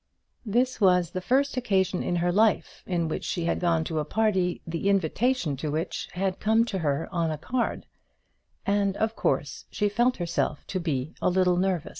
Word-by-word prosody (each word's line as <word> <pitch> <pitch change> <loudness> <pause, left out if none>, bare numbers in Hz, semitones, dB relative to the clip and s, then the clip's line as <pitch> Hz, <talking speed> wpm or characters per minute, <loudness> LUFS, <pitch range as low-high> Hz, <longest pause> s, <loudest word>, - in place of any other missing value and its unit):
This 245 +3 +1
was 180 -3 +4
the 185 - -3
first 265 +6 +1
occasion 190 -6 +1
in 175 - -1
her 175 +1 +1
life 215 +3 +2
in 170 -3 0
which 160 - -3
she 170 -2 -2
had 170 - 0
gone 165 -2 +2
to 160 -1 -2
a - - 0
party, 190 0 +1
the 165 +4 -1
invitation 200 - +1
to 150 +3 -3
which 160 +5 -3
had 190 +1 -1
come 220 +2 +3
to 190 - 0
her 145 -1 -1
on 170 -2 0
a 155 - -2
card, 240 - -2 0.8
and 200 -1 +1
of 220 +1 0
course - - -1
she 205 -1 0
felt 240 +5 +2
herself 170 -4 -2
to 185 - -1
be 150 -4 -2
a - - +3
little 180 0 +3
nervous. 185 -2 0
185 Hz, 190 wpm, -26 LUFS, 165-210 Hz, 0.8 s, was